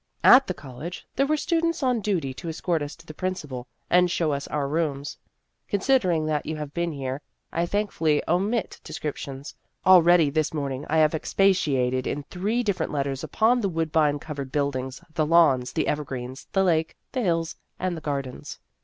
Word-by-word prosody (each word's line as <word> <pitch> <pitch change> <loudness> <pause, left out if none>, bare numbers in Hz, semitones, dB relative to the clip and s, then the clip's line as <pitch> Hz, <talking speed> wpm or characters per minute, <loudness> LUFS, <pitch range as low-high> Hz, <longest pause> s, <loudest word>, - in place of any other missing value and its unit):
" - - -38
At 270 +1 +4
the 185 - -2
college, 140 +5 -8
there 275 +1 +2
were 310 +1 +2
students 335 0 0
on 250 -3 +2
duty 175 -10 -1
to 165 +5 -7
escort 165 0 -1
us 145 0 -5
to 165 - -18
the 155 - -9
Principal, 150 -8 -4 0.2
and 180 0 +4
show 165 -3 0
us 140 0 -3
our 145 -2 -1
rooms. 145 -2 -2 0.5
(Considering 190 -7 +2
that 155 -1 0
you 155 - -4
have 150 -1 -6
been 170 0 -1
here, 135 -1 -4 0.3
I 170 +1 0
thankfully 165 -7 +1
omit 200 +6 0
de - - -9
scriptions. 140 -2 -5 0.3
Already 175 -4 +6
this 155 +1 0
morning 140 -2 -3
I 160 - +2
have 155 0 +4
expatiated 140 -8 +1
in 145 - -2
three 215 +7 0
different 190 -7 -1
letters 140 -2 -2
upon 240 +3 +2
the 200 - 0
woodbine 160 -3 +1
covered 145 -3 -6
buildings, 135 0 -2
the 155 - +1
lawns, 150 -7 +4
the 160 - -1
evergreens, 130 -3 -4
the 195 - +2
lake, 160 -3 +1
the 255 - -1
hills, 165 -5 0 0.2
and 185 -1 -2
the 160 - -7
gardens.) 140 -4 -4
160 Hz, 180 wpm, -25 LUFS, 140-185 Hz, 0.5 s, Already